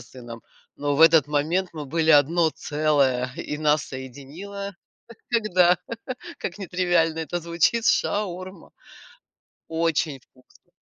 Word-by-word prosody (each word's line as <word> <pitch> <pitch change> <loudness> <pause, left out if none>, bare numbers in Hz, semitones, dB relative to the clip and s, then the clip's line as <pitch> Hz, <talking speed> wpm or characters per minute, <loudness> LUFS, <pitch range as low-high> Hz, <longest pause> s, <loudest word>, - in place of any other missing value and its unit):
с - - -16
сыном, 120 -3 -10 0.3
но 145 -1 -1
в - - 0
этот 160 -3 +6
момент 160 +6 0
мы 155 -3 -6
были 160 +2 +1
одно 160 +3 +4
целое, 140 -5 0
и 150 - -5
нас 150 -1 +2
соединило, 150 +10 -8 0.4
как - - -41 0.2
всегда, 180 -4 +4 0.6
как 180 - -5
нетривиально 175 -4 +1
это 160 +2 -3
звучит, 170 +7 +1
шаурма. 185 -3 -1 1.0
Очень 160 -3 0
вкусно. 130 0 -27
160 Hz, 120 wpm, -24 LUFS, 145-175 Hz, 1.0 s, этот